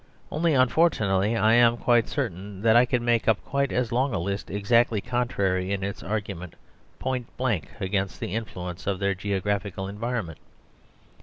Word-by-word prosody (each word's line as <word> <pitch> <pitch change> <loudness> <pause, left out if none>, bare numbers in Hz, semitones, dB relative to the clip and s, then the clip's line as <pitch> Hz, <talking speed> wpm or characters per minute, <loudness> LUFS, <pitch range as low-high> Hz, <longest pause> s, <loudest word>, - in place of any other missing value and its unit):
Only 160 0 +1
unfortunately 115 - +3
I 110 +1 +4
am 120 0 +5
quite 120 -2 +3
certain 100 - -4
that 115 0 +5
I 120 +1 +6
could 125 -1 0
make 120 -1 +1
up 110 -3 +4
quite 140 0 0
as 125 -2 0
long 125 +1 +1
a - - +1
list 100 +3 -3
exactly 110 +2 +2
contrary 100 -6 -1
in 100 -1 -1
its 100 0 -4
argument 100 -4 -4 0.4
point 130 -2 -3
blank 120 -10 -1
against 95 0 -2
the 90 - -4
influence 95 -6 -5
of 100 -2 0
their 100 +1 0
geographical 100 0 -2
environment. 105 -5 -4
105 Hz, 160 wpm, -26 LUFS, 95-120 Hz, 0.4 s, I